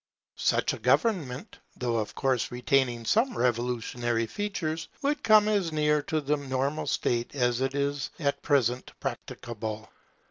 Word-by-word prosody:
Such - - +2
a - - -6
government, 155 - 0 0.2
though 120 -2 -1
of 110 -2 -3
course 130 -3 +1
retaining 125 -2 +1
some 230 - +2
revolutionary 120 -1 0
features, 170 - -3 0.2
would 290 +2 +1
come 215 -1 +6
as 200 -6 +1
near 150 -1 +2
to 155 +2 -1
the 150 +1 +1
normal 140 +2 -2
state 120 +3 0
as 125 -2 +1
is 140 0 -1
at 140 -3 -1
present 130 -4 +1
practicable. 110 -2 -5
135 Hz, 135 wpm, -28 LUFS, 120-155 Hz, 0.2 s, come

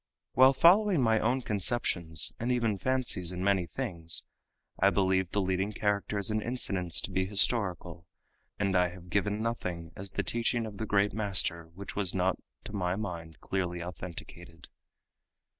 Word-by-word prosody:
While 130 +2 +7
following 185 +4 +5
my 115 -3 +3
own 125 +5 +1
conceptions 95 - 0
and 120 +2 -1
even 115 -5 0
fancies 125 -9 +1
in 90 0 -4
many 95 -3 +2
things, 85 -7 0 0.6
I 100 - +5
believe 95 -2 +1
the 105 - -1
leading 95 +2 -1
characters 100 0 -1
and 110 0 0
incidents 95 -8 -1
to - - -5
be 95 0 0
historical, 95 -4 0 0.5
and 100 -2 0
I 90 0 +3
have 90 -1 -13
given 105 +2 0
nothing 90 -8 -3
as 100 +1 -7
the - - -1
teaching 120 0 0
of 105 -2 -8
the 110 - -3
great 100 0 +2
master 95 -5 +1
which 100 +2 -8
was 100 -3 -1
not 95 0 +1 0.2
to - - -9
my 90 -3 -1
mind 85 -7 -6
clearly 90 -2 -2
authenticated. 85 -1 -9
100 Hz, 160 wpm, -30 LUFS, 90-110 Hz, 0.6 s, While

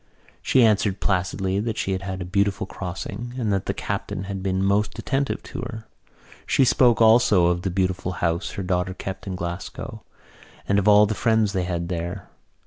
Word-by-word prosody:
She 130 - +4
answered 105 -2 +2
placidly 95 0 0
that 110 +1 -2
she 95 - -1
had 95 0 -1
had 95 -1 -5
a - - -3
beautiful 100 +2 0
crossing 100 +6 -6
and 110 -5 0
that 95 - -2
the - - +1
captain 95 - -4
had 95 0 -5
been 95 0 0
most 100 +2 +1
attentive 135 0 -1
to - - -8
her. 110 0 -7 0.6
She 135 - +4
spoke 120 -1 +4
also 110 -5 +5
of 85 0 +1
the 95 - -1
beautiful 90 0 -1
house 85 0 -1
her 100 - -4
daughter 90 0 -1
kept 95 +1 -6
in 95 - -3
Glasgow, 85 +1 -6 0.7
and 100 +1 +3
of 100 - -1
all 105 0 +7
the 105 - -1
friends 110 -2 +2
they 95 -2 0
had 85 -1 -2
there. 85 +2 -4
95 Hz, 190 wpm, -24 LUFS, 90-105 Hz, 0.7 s, all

